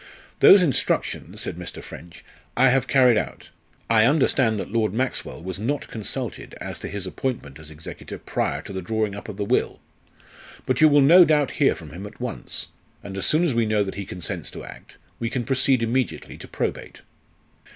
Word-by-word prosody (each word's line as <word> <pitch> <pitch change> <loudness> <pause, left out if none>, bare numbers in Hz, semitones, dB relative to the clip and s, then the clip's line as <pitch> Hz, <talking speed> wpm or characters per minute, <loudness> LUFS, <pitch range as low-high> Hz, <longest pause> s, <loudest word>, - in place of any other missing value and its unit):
"Those 195 -2 +8
instructions," 140 -7 -1
said - - -4
Mr. - - -7
French, 85 +2 -12 0.3
"I 130 +1 +6
have 130 0 +2
carried 125 -4 +5
out. - - -4 0.4
I 110 -1 +4
understand 130 -6 +3
that - - -5
Lord 110 -3 0
Maxwell 130 -8 -3
was 95 +1 -5
not 135 +7 -2
consulted 110 -3 -5
as - - -6
to - - -6
his 100 -1 -5
appointment 95 - -4
as 75 -1 -11
executor 80 +1 -9
prior - - -2
to - - -8
the 95 - -4
drawing 110 +2 -1
up 100 - -8
of 100 - -7
the 100 - -2
will. - - 0 0.9
But 130 +1 0
you 155 - +8
will 145 0 +5
no 170 +7 +8
doubt 150 -4 +2
hear 140 - +5
from 80 -5 -11
him 95 +6 -7
at 105 - -15
once, 125 -2 -5 0.3
and 95 - -7
as 95 - -1
soon 155 +3 +3
as 165 -7 +1
we 115 -1 +1
know 105 -1 +2
that 95 - -5
he 100 -1 -6
consents 90 -1 -5
to - - -9
act, - - -13 0.2
we 115 - -2
can 125 0 -2
proceed 130 -1 +2
immediately 120 +2 -2
to - - -10
probate." - - -4
115 Hz, 195 wpm, -24 LUFS, 100-135 Hz, 0.9 s, Those